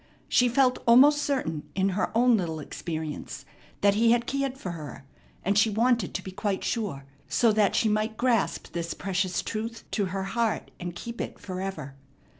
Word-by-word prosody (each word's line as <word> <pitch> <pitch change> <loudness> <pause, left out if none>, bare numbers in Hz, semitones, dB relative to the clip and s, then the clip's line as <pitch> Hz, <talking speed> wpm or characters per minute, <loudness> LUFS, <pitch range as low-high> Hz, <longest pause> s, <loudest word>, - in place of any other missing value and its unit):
She 245 0 +4
felt 255 0 +3
almost 285 +5 +7
certain 255 - -2
in 195 0 +2
her 190 +1 0
own 245 0 +5
little 165 -6 -2
experience 155 0 -6 0.4
that 200 0 +5
He 230 +3 +4
had 240 0 +1
cared 275 0 -2
for 185 -9 -5
her, 150 -6 -8 0.4
and 200 +2 +2
she 220 - +4
wanted 230 -1 +1
to 190 - -2
be 190 - -7
quite 195 0 -2
sure, 195 - -2 0.2
so 230 -2 +4
that 210 -2 +2
she 225 - +3
might 215 +1 0
grasp 240 -4 0
this 170 0 -3
precious 185 -1 -1
truth 225 +1 -4
to 205 - 0
her 190 +1 -3
heart 225 +2 -1
and 175 -1 -5
keep 235 +6 -6
it - - -5
forever. 185 -7 -5
205 Hz, 180 wpm, -27 LUFS, 180-235 Hz, 0.4 s, almost